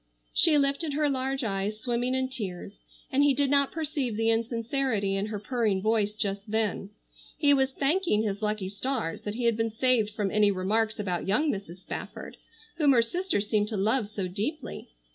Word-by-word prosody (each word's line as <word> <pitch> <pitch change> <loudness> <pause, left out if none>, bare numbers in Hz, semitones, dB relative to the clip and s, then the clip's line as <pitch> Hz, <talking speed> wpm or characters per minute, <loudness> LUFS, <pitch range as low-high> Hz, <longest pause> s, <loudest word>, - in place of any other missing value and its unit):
She 315 -3 +5
lifted 280 +2 +1
her 300 +1 +2
large 270 0 -1
eyes 205 0 -2
swimming 245 +2 0
in 260 0 +1
tears, 200 -6 -6 0.3
and 275 +1 +3
he 285 -2 +4
did 280 0 +2
not 280 -1 +3
perceive 290 -8 -2
the 225 0 +3
insincerity 230 -2 0
in 195 +1 -1
her 215 -1 -4
purring 215 -3 0
voice 210 0 +1
just 200 0 -3
then. 215 -2 -1 0.5
He 285 -2 +4
was 265 -1 +3
thanking 280 - +1
his 205 -1 -2
lucky 210 -2 -1
stars 215 -4 -3
that 205 0 -4
he 245 - -3
had 235 -1 +3
been 225 +1 0
saved 225 -1 +2
from 205 -2 -2
any 210 -1 +4
remarks 215 +4 0
about 185 -4 -2
young 290 +10 +2
Mrs. 190 -3 -7
Spafford, - - -7 0.4
whom 290 -4 +5
her 235 -2 +5
sister 355 - -1
seemed 210 0 +1
to 215 -1 -3
love 215 +2 +1
so 200 -3 -3
deeply. 230 - -4
225 Hz, 185 wpm, -28 LUFS, 205-270 Hz, 0.5 s, She